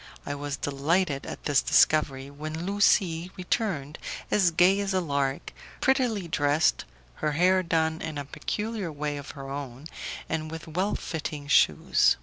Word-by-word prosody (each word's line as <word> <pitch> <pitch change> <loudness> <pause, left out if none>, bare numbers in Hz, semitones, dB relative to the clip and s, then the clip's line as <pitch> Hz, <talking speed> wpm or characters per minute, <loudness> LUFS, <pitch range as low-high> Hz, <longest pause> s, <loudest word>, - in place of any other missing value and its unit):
I 145 - -3
was 145 0 -4
delighted 145 +2 0
at - - -7
this 145 -2 +3
discovery, 140 -3 +3
when 155 +3 -5
Lucie 185 -3 +2
returned 180 - -2 0.3
as 190 -4 +4
gay 180 +4 +4
as 200 -1 -1
a - - +4
lark, 140 -5 -1 0.3
prettily 250 -9 +1
dressed, 145 0 +2 0.3
her 150 - -1
hair 185 +4 +4
done 160 -2 0
in 155 -2 -4
a 145 - -4
peculiar 210 +5 -3
way 145 0 -3
of 140 - -8
her 135 0 -7
own, 135 -1 -6 0.4
and 155 -1 -2
with 160 +1 -7
well 185 +6 -1
fitting 150 -2 -5
shoes. - - +4
160 Hz, 150 wpm, -27 LUFS, 145-185 Hz, 0.4 s, as